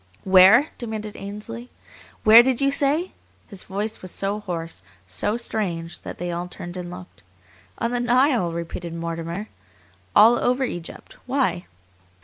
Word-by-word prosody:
"Where?" 190 +10 +7
demanded 215 -3 -5
Ainsley. 215 +4 -7 0.5
"Where 220 +2 +10
did 255 0 0
you 275 0 +3
say?" 295 +6 +1 0.3
His 200 -3 -9
voice 210 +3 -4
was 185 - -7
so 200 +3 -2
hoarse, 170 -5 -5 0.2
so 95 - -1
strange, 175 -8 -3
that - - -8
they 175 0 -4
all 175 +1 -4
turned 175 0 -9
and 180 -1 -6
looked. 180 +1 -11 0.6
"On 230 0 -1
the 245 - 0
Nile," 245 - +2
repeated 170 0 -5
Mortimer. 170 +4 -5 0.7
"All 230 +3 +7
over 250 +2 +1
Egypt. 175 -9 -7
Why?" 255 -9 0
205 Hz, 140 wpm, -23 LUFS, 175-240 Hz, 0.7 s, Where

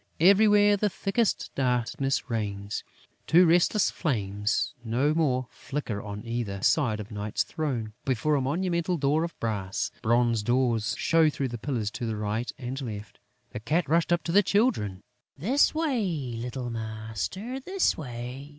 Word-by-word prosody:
Everywhere, 205 +3 +6
the 210 +1 +1
thickest 200 +4 -1
darkness 130 +1 0
reigns. 105 -4 -3 0.4
Two 175 +3 +6
restless 175 +5 +3
flames 105 -5 -1
no 125 +6 +1
more 135 -6 +1
flicker 130 -8 -4
on 105 +1 -7
either 115 -5 -3
side 125 -9 +2
of 105 +1 -7
Night's 105 0 -1
throne, 125 -9 -3
before 135 +4 +1
a 140 - +2
monumental 170 +5 0
door 150 +2 +2
of 170 - -6
brass. 100 -4 -2
Bronze 115 0 +2
doors 120 -1 +1
show 165 -1 +4
through 140 -3 -2
the 120 -1 -6
pillars 115 -5 -2
to 120 - -4
the 110 -1 -2
right 105 +3 -2
and 130 +2 -5
left. 105 -5 -7 0.3
The - - -5
Cat 150 +10 0
rushed 165 +3 +2
up 175 0 +2
to 170 - -2
the 200 +4 +6
Children: 185 - +1 0.3
"This 250 - +3
way, 200 - -1
little 120 +1 -4
master, 110 - -4
this 375 +7 +1
way!... 125 0 -7
130 Hz, 150 wpm, -27 LUFS, 110-170 Hz, 0.4 s, Everywhere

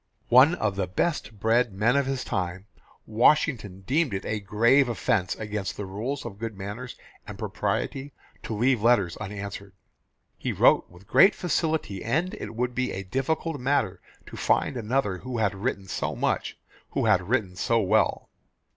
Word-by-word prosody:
One 135 +8 +7
of 105 - -1
the 95 -2 0
best 105 - -2
bred 115 +2 +2
men 110 +6 +2
of 140 -1 +2
his 135 -2 -2
time, 95 0 -3 0.4
Washington 110 - +2
deemed 135 - 0
it 95 - -4
a 110 - -2
grave 115 +7 +3
offence 105 -4 0
against 105 -2 -4
the 105 - -4
rules 115 +9 -4
of 100 -4 -8
good 115 -3 -5
manners 105 +6 -6 0.3
and - - -8
propriety 135 +2 -3 0.3
to 110 - -5
leave 120 +1 +2
letters 105 -7 +3
unanswered. 100 -1 -7 0.7
He - - -2
wrote - - +4
with 90 +2 -17
great 195 - +6
facility, 160 - -1
and 165 +11 0
it - - -7
would 125 +1 -1
be 130 +1 -1
a 95 - -4
difficult 145 - -2
matter 125 -8 0 0.2
to - - -10
find - - +1
another 110 -4 -1
who 125 -1 -5
had 105 -2 +1
written 100 -1 -3
so - - -3
much, - - -1 0.4
who - - 0
had 90 +1 +2
written 110 -8 0
so 115 +5 +1
well. 95 -4 +1
110 Hz, 165 wpm, -26 LUFS, 100-130 Hz, 0.7 s, One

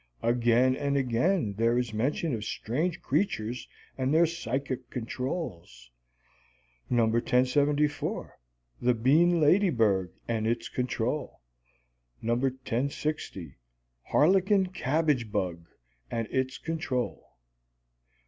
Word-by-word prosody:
Again 120 +2 +3
and 140 0 0
again 130 - +1
there 115 +1 +3
is 120 -3 -1
mention 135 +7 0
of 110 -3 -3
strange 145 +10 -2
creatures 120 - -1 0.3
and 130 +1 +1
their 165 +2 +5
psychic 135 -5 -3
"controls": 110 - -5 1.0
No. 120 -2 +3
1074, 140 +6 +1 0.5
"The 125 0 +3
Bean 160 +9 +4
Ladybird 120 - +3 0.2
and 110 -2 -1
Its 115 +1 -1
Control"; 125 +2 -2 0.8
No. 115 - 0
1060, 130 - -2 0.5
"Harlequin 190 +4 +3
Cabbage 140 - 0
Bug 85 -4 -2 0.4
and 115 -1 -2
Its 130 0 -1
Control"; 155 -6 -2
No. - - -29
125 Hz, 100 wpm, -28 LUFS, 115-150 Hz, 1.0 s, their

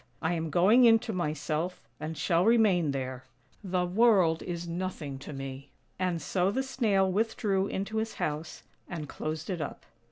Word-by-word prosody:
I 160 +2 0
am 165 -1 -2
going 205 - +5
into 225 -1 +4
myself, 155 +1 -2 0.2
and 155 +1 -5
shall 170 -1 +2
remain 205 -7 +4
there. 130 -2 -4 0.4
The 180 -2 0
world 185 -4 +4
is 175 -1 -5
nothing 170 -6 -4
to 140 - -8
me." 135 -1 -7 0.3
And 180 -2 0
so 180 +5 0
the 265 +7 0
Snail 215 -8 +1
withdrew 205 -1 0
into 200 +3 -3
his 220 0 -2
house, 150 +2 -4 0.3
and 160 -5 -5
closed 155 +2 -4
it 175 -3 -3
up. 145 - -6
175 Hz, 160 wpm, -29 LUFS, 155-200 Hz, 0.4 s, going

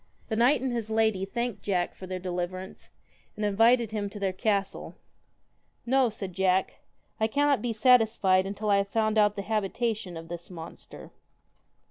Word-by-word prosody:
The 220 - -1
knight 245 +4 +4
and 260 -1 -1
his 230 -2 -3
lady 220 -3 +1
thanked 235 0 -3
Jack 180 -4 -1
for 185 - -10
their 185 0 -4
deliverance, 180 +1 -5 0.5
and 210 - -2
invited 225 +3 +3
him 205 -2 -2
to 205 +1 -9
their 195 -2 -1
castle. 200 0 -2 0.5
* - - -44
No,' 260 0 +3
said 195 -4 -6
Jack, 190 0 +1 0.2
' - - -42
I 220 - +2
cannot 285 +3 +2
be 245 - -1
satisfied 215 -5 +4
until 205 +1 -2
I 200 - +5
have 200 0 0
found 215 +1 +1
out 210 0 +3
the 200 - -4
habitation 215 -2 -2
of 165 0 -9
this 170 0 -8
monster.' 165 -2 -10
210 Hz, 175 wpm, -27 LUFS, 190-225 Hz, 0.5 s, I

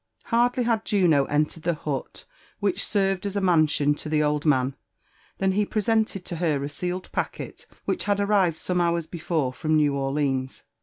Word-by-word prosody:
Hardly 245 +1 +3
had 230 -2 +1
Juno 175 -11 +3
entered 150 +3 0
the 170 0 0
hut 145 -3 -5 0.3
which 200 -3 0
served 195 -1 0
as 200 0 -3
a - - +3
i^ansion 155 -5 +3
to 155 - -7
the 150 -1 +2
old 150 +1 0
man, 130 -2 +2 0.6
than 195 0 +1
he 205 +2 +2
presented 215 -2 0
to 170 - -5
her 155 -5 0
a 140 - -3
sealed 180 +4 -4
packet - - -4 0.2
which - - -1
had 205 -1 +1
arrived 200 -5 +2
some 180 +1 -1
hours 170 -1 +1
before 160 -6 -2
from 155 +5 0
New 150 -2 +3
Orleans. 135 -1 -1
170 Hz, 175 wpm, -25 LUFS, 150-195 Hz, 0.6 s, Hardly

